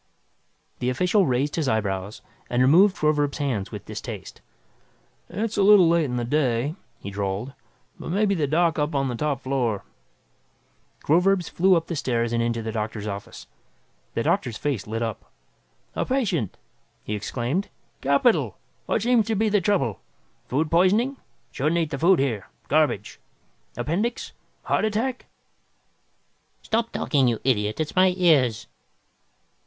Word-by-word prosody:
The 125 Hz, -, 0 dB
official 180 Hz, -, +2 dB
raised 135 Hz, +5 st, 0 dB
his 150 Hz, -5 st, 0 dB
eyebrows 100 Hz, -2 st, -2 dB, 0.3 s
and 120 Hz, +1 st, +2 dB
removed 185 Hz, +9 st, +5 dB
Groverzb's 150 Hz, -2 st, +1 dB
hands 130 Hz, -10 st, -2 dB
with -, -, -8 dB
distaste. -, -, -8 dB, 0.9 s
"It's 215 Hz, +4 st, -3 dB
a -, -, +3 dB
little 195 Hz, -3 st, +7 dB
late 165 Hz, -1 st, +3 dB
in 125 Hz, -3 st, -3 dB
the 120 Hz, -1 st, -1 dB
day," 130 Hz, 0 st, 0 dB, 0.3 s
he 100 Hz, -, -7 dB
drawled, 100 Hz, +6 st, -3 dB, 0.5 s
"but -, -, -7 dB
maybe 200 Hz, +3 st, +2 dB
the 155 Hz, -6 st, 0 dB
doc 165 Hz, +2 st, +2 dB
up 150 Hz, +1 st, -1 dB
on 135 Hz, -1 st, +1 dB
the 120 Hz, -, -3 dB
top 140 Hz, 0 st, -1 dB
floor 125 Hz, -6 st, -1 dB, 0.6 s
" -, -, -36 dB
Groverzb 180 Hz, +2 st, +2 dB
flew 185 Hz, +1 st, +4 dB
up 165 Hz, -1 st, 0 dB
the 170 Hz, -, -4 dB
stairs 120 Hz, -5 st, -1 dB
and 115 Hz, -, +1 dB
into 115 Hz, -1 st, -1 dB
the 110 Hz, -, -3 dB
doctor's 110 Hz, -1 st, -4 dB
office. 100 Hz, -1 st, -7 dB, 0.7 s
The -, -, 0 dB
doctor's 115 Hz, -4 st, 0 dB
face 130 Hz, -10 st, -2 dB
lit 115 Hz, +2 st, -2 dB
up. 115 Hz, -3 st, -5 dB, 0.6 s
"A -, -, 0 dB
patient!" 195 Hz, -, -1 dB, 0.5 s
he 105 Hz, -, -4 dB
exclaimed. 120 Hz, -, -2 dB, 0.3 s
"Capital! 140 Hz, -, +2 dB, 0.3 s
What 220 Hz, -, 0 dB
seems 240 Hz, -2 st, +3 dB
to 225 Hz, -, 0 dB
be 215 Hz, +2 st, +2 dB
the 205 Hz, -1 st, +2 dB
trouble? 155 Hz, -, 0 dB, 0.5 s
Food 150 Hz, +4 st, -1 dB
poisoning? 210 Hz, +10 st, +3 dB, 0.3 s
Shouldn't 150 Hz, +5 st, 0 dB
eat 165 Hz, -3 st, 0 dB
the 140 Hz, -, -3 dB
food 180 Hz, +3 st, +5 dB
here. 120 Hz, -8 st, -1 dB, 0.2 s
Garbage. 150 Hz, -9 st, +1 dB, 0.6 s
Appendix? 175 Hz, -, -2 dB, 0.3 s
Heart -, -, +1 dB
attack?" 235 Hz, +4 st, -2 dB, 1.4 s
"Stop 230 Hz, +1 st, -1 dB
talking, 135 Hz, -4 st, +1 dB
you 115 Hz, -2 st, 0 dB
idiot, 110 Hz, -3 st, 0 dB
it's 155 Hz, -1 st, -3 dB
my 185 Hz, -1 st, +4 dB
ears!" 140 Hz, -, +3 dB
145 Hz, 150 wpm, -24 LUFS, 120-185 Hz, 1.4 s, little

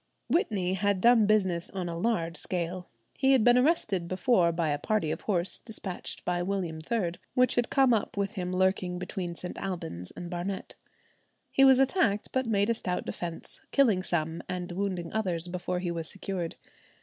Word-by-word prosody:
Whitney 195 Hz, -, +1 dB
had 200 Hz, 0 st, +1 dB
done 230 Hz, 0 st, +5 dB
business 190 Hz, -5 st, +2 dB
on 185 Hz, -2 st, -4 dB
a 170 Hz, -, -4 dB
large 170 Hz, -3 st, 0 dB
scale. 180 Hz, 0 st, -2 dB, 0.3 s
He 270 Hz, 0 st, +5 dB
had 255 Hz, -5 st, +4 dB
been 245 Hz, +1 st, +6 dB
arrested 250 Hz, -, +2 dB
before 185 Hz, -1 st, +3 dB
by 165 Hz, -1 st, 0 dB
a 145 Hz, 0 st, 0 dB
party 175 Hz, -4 st, 0 dB
of 160 Hz, -, -4 dB
horse 175 Hz, -4 st, 0 dB
despatched 210 Hz, -5 st, -6 dB
by 175 Hz, 0 st, 0 dB
William 180 Hz, -4 st, -2 dB
III, 205 Hz, -8 st, +1 dB, 0.2 s
which 255 Hz, -1 st, +4 dB
had 240 Hz, -1 st, +1 dB
come 265 Hz, -3 st, +4 dB
up 210 Hz, -2 st, -1 dB
with 200 Hz, +1 st, -1 dB
him 180 Hz, -4 st, -3 dB
lurking 185 Hz, -1 st, +1 dB
between 180 Hz, -1 st, -4 dB
St. 180 Hz, -, -6 dB
Alban's 165 Hz, -, -5 dB
and 175 Hz, -, -8 dB
Barnet. 180 Hz, +2 st, -4 dB, 0.8 s
He 270 Hz, -, +4 dB
was 265 Hz, -1 st, +8 dB
attacked, 265 Hz, -, +2 dB
but 260 Hz, -2 st, 0 dB
made 205 Hz, 0 st, +2 dB
a -, -, +3 dB
stout 180 Hz, -5 st, -3 dB
defence, 170 Hz, -2 st, -5 dB
killing 230 Hz, -10 st, +3 dB
some 165 Hz, -2 st, -1 dB
and 180 Hz, -1 st, -4 dB
wounding 180 Hz, -2 st, -3 dB
others 180 Hz, -6 st, -1 dB
before 180 Hz, 0 st, -3 dB
he 180 Hz, -1 st, -2 dB
was 165 Hz, -2 st, -2 dB
secured. 185 Hz, -3 st, -3 dB
185 Hz, 180 wpm, -29 LUFS, 175-215 Hz, 0.8 s, was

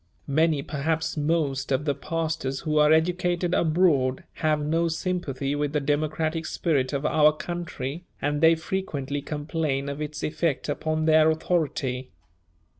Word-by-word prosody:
Many, 155 Hz, 0 st, +2 dB
perhaps 160 Hz, +3 st, -1 dB
most, 145 Hz, -3 st, 0 dB
of 135 Hz, +2 st, +1 dB
the 145 Hz, -, +2 dB
pastors 155 Hz, -2 st, -3 dB
who 155 Hz, -2 st, +1 dB
are 150 Hz, 0 st, +5 dB
educated 175 Hz, +2 st, +2 dB
abroad 155 Hz, -7 st, +2 dB, 0.2 s
have 155 Hz, -1 st, +2 dB
no 165 Hz, +3 st, +1 dB
sympathy 160 Hz, -5 st, -2 dB
with 145 Hz, 0 st, -1 dB
the 150 Hz, -, +2 dB
democratic 155 Hz, +3 st, -1 dB
spirit 140 Hz, -7 st, 0 dB
of 140 Hz, 0 st, -2 dB
our 150 Hz, 0 st, +5 dB
country, 170 Hz, -1 st, -5 dB
and 145 Hz, +1 st, -1 dB
they 165 Hz, 0 st, +6 dB
frequently 150 Hz, -5 st, -3 dB
complain 145 Hz, -1 st, -2 dB
of 140 Hz, +1 st, -5 dB
its 150 Hz, 0 st, -5 dB
effect 155 Hz, -2 st, -1 dB
upon 155 Hz, +2 st, -1 dB
their 155 Hz, 0 st, +5 dB
authority. 150 Hz, -6 st, -1 dB
155 Hz, 140 wpm, -26 LUFS, 140-165 Hz, 0.2 s, they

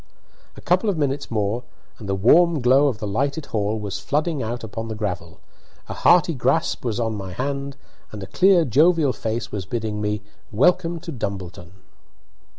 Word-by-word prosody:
A -, -, -10 dB
couple 185 Hz, +4 st, +1 dB
of 190 Hz, -, -1 dB
minutes 140 Hz, -1 st, -1 dB
more, 110 Hz, +2 st, -1 dB, 0.4 s
and 105 Hz, -4 st, -8 dB
the 100 Hz, -, +1 dB
warm 160 Hz, -, +4 dB
glow 130 Hz, +3 st, +4 dB
of 130 Hz, -6 st, -1 dB
the 105 Hz, -, -5 dB
lighted 140 Hz, +9 st, -1 dB
hall 105 Hz, 0 st, -1 dB
was 100 Hz, -1 st, -4 dB
flooding 150 Hz, 0 st, -1 dB
out 120 Hz, +2 st, -4 dB
upon 115 Hz, +1 st, -5 dB
the 110 Hz, -, -5 dB
gravel, 90 Hz, -6 st, -5 dB, 0.5 s
a -, -, -5 dB
hearty 170 Hz, -1 st, +4 dB
grasp 160 Hz, +5 st, 0 dB
was 120 Hz, -2 st, -2 dB
on 115 Hz, -2 st, -1 dB
my 95 Hz, -3 st, -6 dB
hand, 140 Hz, +4 st, -4 dB, 0.3 s
and 105 Hz, -2 st, -7 dB
a -, -, -5 dB
clear 180 Hz, -, +4 dB
jovial 155 Hz, +3 st, +3 dB
voice 115 Hz, +1 st, -4 dB
was 95 Hz, -4 st, -5 dB
bidding 110 Hz, -2 st, -3 dB
me 105 Hz, 0 st, -2 dB, 0.3 s
"welcome 170 Hz, -, +2 dB
to 165 Hz, -, -7 dB
Dumbleton." 95 Hz, -, -6 dB
120 Hz, 175 wpm, -22 LUFS, 105-150 Hz, 0.5 s, warm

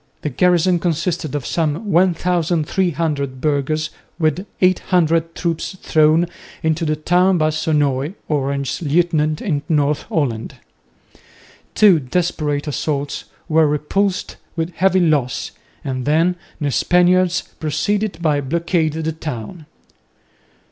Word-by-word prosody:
The 150 Hz, -, -2 dB
garrison 180 Hz, +3 st, +3 dB
consisted 165 Hz, -2 st, -1 dB
of 140 Hz, -4 st, -3 dB
some 165 Hz, -, -1 dB
1300 170 Hz, -5 st, +1 dB
burghers 150 Hz, +2 st, 0 dB, 0.3 s
with 160 Hz, +4 st, 0 dB
800 165 Hz, -3 st, +2 dB
troops 170 Hz, +2 st, -3 dB
thrown 155 Hz, +2 st, +3 dB, 0.4 s
into 160 Hz, +1 st, 0 dB
the 155 Hz, 0 st, +1 dB
town 180 Hz, +4 st, +2 dB
by 155 Hz, -1 st, +2 dB
Sonoy, 150 Hz, -1 st, 0 dB
Orange's 140 Hz, -1 st, -1 dB
lieutenant 155 Hz, -1 st, +1 dB
in 150 Hz, -7 st, -1 dB
North 150 Hz, -2 st, +2 dB
Holland. 120 Hz, -8 st, -2 dB, 1.2 s
Two 200 Hz, -6 st, +6 dB
desperate 150 Hz, 0 st, -1 dB
assaults 145 Hz, -1 st, -3 dB, 0.2 s
were 160 Hz, -1 st, +4 dB
repulsed 180 Hz, +7 st, -1 dB, 0.2 s
with 165 Hz, +1 st, -2 dB
heavy 190 Hz, +2 st, +3 dB
loss, 150 Hz, -7 st, 0 dB, 0.3 s
and 130 Hz, -2 st, -3 dB
then 165 Hz, +4 st, +2 dB, 0.2 s
the 145 Hz, -3 st, -1 dB
Spaniards 180 Hz, +3 st, +3 dB, 0.2 s
proceeded 205 Hz, +7 st, 0 dB
to 155 Hz, -3 st, 0 dB
blockade 165 Hz, +2 st, 0 dB
the 160 Hz, 0 st, -2 dB
town. 155 Hz, -, -7 dB
160 Hz, 110 wpm, -19 LUFS, 150-175 Hz, 1.2 s, Two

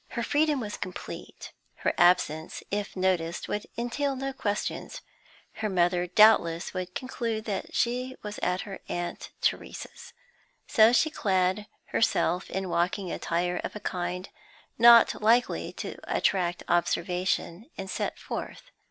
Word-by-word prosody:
Her 235 Hz, -, -4 dB
freedom 295 Hz, +3 st, +2 dB
was 210 Hz, -4 st, -5 dB
complete; 180 Hz, -, -7 dB, 0.2 s
her -, -, -1 dB
absence, 160 Hz, -3 st, +2 dB
if 205 Hz, 0 st, -2 dB
noticed, 180 Hz, -3 st, 0 dB
would 210 Hz, -, -3 dB
entail 270 Hz, +4 st, -1 dB
no 270 Hz, +1 st, -3 dB
questions; 210 Hz, -6 st, -3 dB, 0.6 s
her 220 Hz, -1 st, -1 dB
mother 175 Hz, -1 st, +2 dB
doubtless 180 Hz, -4 st, +4 dB
would 185 Hz, -1 st, -5 dB
conclude 230 Hz, -4 st, -3 dB
that 200 Hz, -3 st, -4 dB
she 250 Hz, +2 st, 0 dB
was 210 Hz, 0 st, -6 dB
at 180 Hz, +1 st, 0 dB
her 195 Hz, -1 st, -7 dB
aunt 175 Hz, 0 st, -4 dB
Theresa's. -, -, -3 dB, 0.5 s
So 220 Hz, -3 st, +6 dB
she 315 Hz, +5 st, +3 dB
clad 190 Hz, -2 st, +1 dB, 0.2 s
herself 185 Hz, -5 st, +1 dB
in 190 Hz, 0 st, -3 dB
walking 180 Hz, +2 st, 0 dB
attire 175 Hz, +1 st, -1 dB
of -, -, -5 dB
a -, -, -5 dB
kind 180 Hz, -1 st, -3 dB, 0.5 s
not 235 Hz, -1 st, +7 dB
likely 235 Hz, +3 st, +2 dB
to -, -, -6 dB
attract 175 Hz, -3 st, 0 dB
observation, 180 Hz, -, 0 dB
and 195 Hz, -, -5 dB
set -, -, -3 dB
forth. -, -, -7 dB
195 Hz, 135 wpm, -28 LUFS, 180-235 Hz, 0.6 s, not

